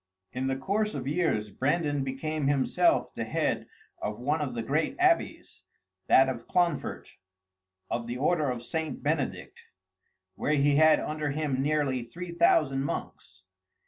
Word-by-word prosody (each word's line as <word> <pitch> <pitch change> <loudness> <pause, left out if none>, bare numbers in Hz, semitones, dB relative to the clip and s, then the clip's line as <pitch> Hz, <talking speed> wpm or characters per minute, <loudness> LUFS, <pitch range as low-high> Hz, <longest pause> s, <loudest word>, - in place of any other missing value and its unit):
In 130 +1 -2
the 135 - 0
course 205 +10 -1
of 135 -1 -4
years, 145 - 0
Brandan 145 - 0
became 140 +2 -2
himself 140 -2 +2
the - - -3
head - - -1 0.3
of 105 0 -3
one 150 +5 0
of 130 -5 -3
the 115 - -2
great 150 +6 0
abbeys, 360 -2 +1 0.5
that 135 - +6
of 120 -3 -4
Clonfert, 175 -4 0 0.8
of 115 0 -3
the 120 +1 -4
order 150 +1 +1
of 120 -1 -4
St. 160 +4 -4
Benedict, 470 - -2 0.7
where 150 - -1
he 145 0 +3
had 155 0 +6
under 155 -1 -3
him 145 -2 -1
nearly 145 -3 0
three 170 +10 -8
thousand 155 -5 +3
monks. 95 -8 -6
145 Hz, 145 wpm, -28 LUFS, 130-155 Hz, 0.8 s, that